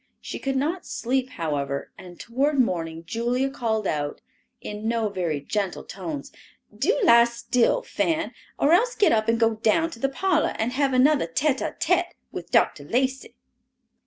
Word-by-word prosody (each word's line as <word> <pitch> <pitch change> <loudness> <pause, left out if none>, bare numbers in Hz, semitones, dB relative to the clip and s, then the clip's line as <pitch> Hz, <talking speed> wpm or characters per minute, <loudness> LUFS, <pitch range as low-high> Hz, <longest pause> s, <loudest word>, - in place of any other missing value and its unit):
She - - -7
could 270 0 -2
not 315 +7 -1
sleep, 260 +2 -1
however, 145 - -3
and 175 -1 -12
toward 275 +5 0
morning 165 -7 0
Julia 240 +7 -1
called 220 -5 -1
out, 145 -4 -2 0.4
in 210 +1 -6
no 225 -2 0
very 175 -7 -2
gentle 195 +5 -3
tones, 165 -7 -6 0.4
"Do 315 - +1
lie 235 -9 +7
still, 235 - +1
Fan, 330 -1 -1 0.2
or 290 - +3
else 475 +7 +3
get 410 - +4
up 220 0 +2
and 230 0 +2
go 225 -1 +3
down 320 +10 +2
in 230 - -16
the 270 - +2
parlor 325 +2 +1
and 225 +2 -1
have 270 +1 +1
another 270 - +4
tete 265 - 0
a - - -3
tete 350 +2 +1 0.2
with - - -7
Dr. - - +2
Lacey." 265 +2 -1
235 Hz, 165 wpm, -25 LUFS, 200-280 Hz, 0.4 s, lie